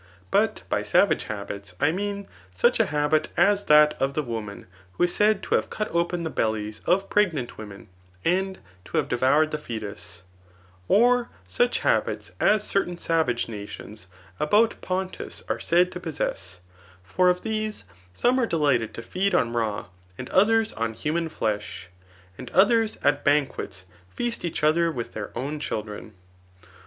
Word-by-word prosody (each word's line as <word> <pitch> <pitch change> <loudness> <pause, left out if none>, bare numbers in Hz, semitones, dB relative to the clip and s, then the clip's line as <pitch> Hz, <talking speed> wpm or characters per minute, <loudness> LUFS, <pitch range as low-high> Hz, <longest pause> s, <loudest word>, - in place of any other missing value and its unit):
But - - +2
by - - 0
Savage - - +2
habits, 100 -2 -6
I 145 - +3
mean 200 +2 -3 0.3
such 480 - +3
a - - +3
habit 150 +1 +1
as 200 +3 +3
that 150 0 +6
of 135 +1 0
the 155 - 0
woman 110 -5 -6 0.3
who 100 - 0
is 175 - +2
said 210 -1 +2
to - - -2
have - - +1
cut 215 - -3
open 170 0 0
the 160 - -3
bellies 110 -3 -2
of 195 +2 +2
preg* 205 -4 +2
nant 125 -7 -5
women, 105 -2 -10 0.4
and 190 +2 +1 0.3
to - - -4
have - - +1
devoured 140 +6 +3
the 155 - -2
foetus; 105 - -7 0.6
or 245 +3 +4 0.2
snch 485 - +1
habits - - 0
as 210 -1 +3
certain 185 -4 -1
savage 160 -9 0
nations 105 -2 -9 0.3
about 215 +9 +3
Pontus 185 0 -4
are - - -2
said 180 +2 +3
to 180 - -6
possess^ 95 - -4 0.5
For 180 - +2
of 180 0 0
these, 215 - -3 0.3
some 245 - +2
are 240 - +2
delighted 140 - +1
to 115 - -7
feed 195 - 0
on 115 - +1
raw, 110 -3 -1 0.3
and - - -7
others 225 +3 +3
on 115 0 -3
human 165 +5 -1
flesh, 105 - -3 0.5
and 125 - -7
others 225 +2 +4
at 145 0 +2
banquets 140 -10 0 0.2
feast 235 - -3
each 170 -3 -3
other 165 +2 +3
with 120 -6 -5
their 105 -2 -5
own 145 +5 -3
children. 105 -5 -5
155 Hz, 160 wpm, -25 LUFS, 115-195 Hz, 0.6 s, that